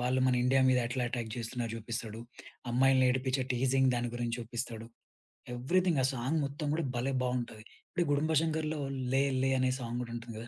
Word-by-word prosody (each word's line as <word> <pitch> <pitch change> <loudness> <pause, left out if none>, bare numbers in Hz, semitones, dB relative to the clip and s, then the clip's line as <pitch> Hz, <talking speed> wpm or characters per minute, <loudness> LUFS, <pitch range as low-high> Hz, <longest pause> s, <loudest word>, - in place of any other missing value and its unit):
వాళ్లు 125 +1 +1
మన 125 - +3
ఇండియా 135 +1 +4
మీద 130 -1 +4
ఎట్లా 125 +1 -2
ఎటాక్ 115 -2 -3
జేస్తున్నారో 115 -1 -3
జూపిస్తడు. 115 -1 -5 0.5
అమ్మాయిలని 130 +1 +4
ఏడిపించే 130 +1 0
టీజింగ్ 130 +1 +3
దాని 120 0 -1
గురించి 120 -1 -2
చూపిస్తడు. 115 -1 -5 0.7
ఎవ్రిథింగ్ 165 +5 +2
ఆ - - +4
సాంగ్ 130 +6 -1
మొత్తం 145 +2 -4
గూడా 165 0 0
భలే! 130 +3 0
బావుంటది. 120 -3 -2 0.3
ఇప్పుడు 175 - 0
'గుడుంబా 155 +2 +2
శంకర్‌లో' 155 -1 -1 0.3
'లే 135 +1 +4 0.2
లే' 135 0 +3
అనే 130 - +3
సాంగ్ 120 0 -3
గూడా 115 -1 -6
ఉంటుంది 115 -1 -7
గదా! 115 - -8
125 Hz, 180 wpm, -31 LUFS, 120-135 Hz, 0.7 s, ఇండియా